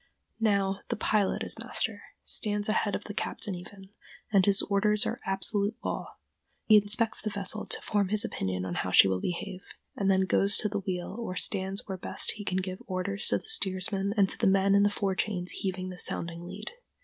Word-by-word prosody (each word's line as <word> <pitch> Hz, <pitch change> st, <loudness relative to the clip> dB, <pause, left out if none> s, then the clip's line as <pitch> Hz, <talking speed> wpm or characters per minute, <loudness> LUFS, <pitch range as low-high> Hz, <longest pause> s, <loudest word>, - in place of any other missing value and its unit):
Now 200 Hz, -3 st, +1 dB
the -, -, -1 dB
pilot 210 Hz, -2 st, +1 dB
is -, -, -1 dB
master—stands 210 Hz, -1 st, -1 dB
ahead 215 Hz, -1 st, +1 dB
of -, -, -5 dB
the 205 Hz, -, -7 dB
captain 205 Hz, 0 st, -2 dB
even—and 190 Hz, +1 st, -3 dB
his 200 Hz, -1 st, +5 dB
orders 210 Hz, +2 st, +2 dB
are 230 Hz, +4 st, -3 dB
absolute 200 Hz, +2 st, -1 dB
law. -, -, -4 dB, 0.5 s
He 215 Hz, -, +7 dB
inspects 215 Hz, +2 st, +3 dB
the 215 Hz, -, -2 dB
vessel 205 Hz, +1 st, -1 dB
to -, -, 0 dB
form 205 Hz, -2 st, +1 dB
his 215 Hz, +3 st, +3 dB
opinion 95 Hz, -, -3 dB
of 90 Hz, -1 st, -4 dB
how 90 Hz, -, -1 dB
she 90 Hz, -, +7 dB
will 95 Hz, -1 st, -1 dB
behave, 185 Hz, +1 st, -4 dB, 0.3 s
and 195 Hz, -1 st, 0 dB
then 190 Hz, 0 st, +4 dB
goes 195 Hz, +2 st, +3 dB
to 210 Hz, -, +2 dB
the 205 Hz, 0 st, -2 dB
wheel 185 Hz, -1 st, -4 dB
or 225 Hz, -6 st, -4 dB
stands 195 Hz, +1 st, +1 dB
where 190 Hz, -2 st, -5 dB
best -, -, 0 dB
he 210 Hz, -, -7 dB
can 185 Hz, -2 st, -1 dB
give 185 Hz, 0 st, -3 dB
his -, -, -17 dB
orders 195 Hz, +3 st, -2 dB
to -, -, +2 dB
the -, -, -11 dB
steersman 195 Hz, -, +1 dB
and 200 Hz, -2 st, +5 dB
to -, -, -5 dB
the -, -, +3 dB
men 195 Hz, +1 st, +4 dB
in 200 Hz, -, +5 dB
the 205 Hz, -, +4 dB
fore 200 Hz, -1 st, -1 dB
chains 185 Hz, -2 st, -2 dB
heaving 185 Hz, -1 st, -3 dB
the 180 Hz, -1 st, -9 dB
sounding 170 Hz, 0 st, -4 dB
lead. 195 Hz, +4 st, -7 dB
195 Hz, 205 wpm, -29 LUFS, 185-210 Hz, 0.5 s, He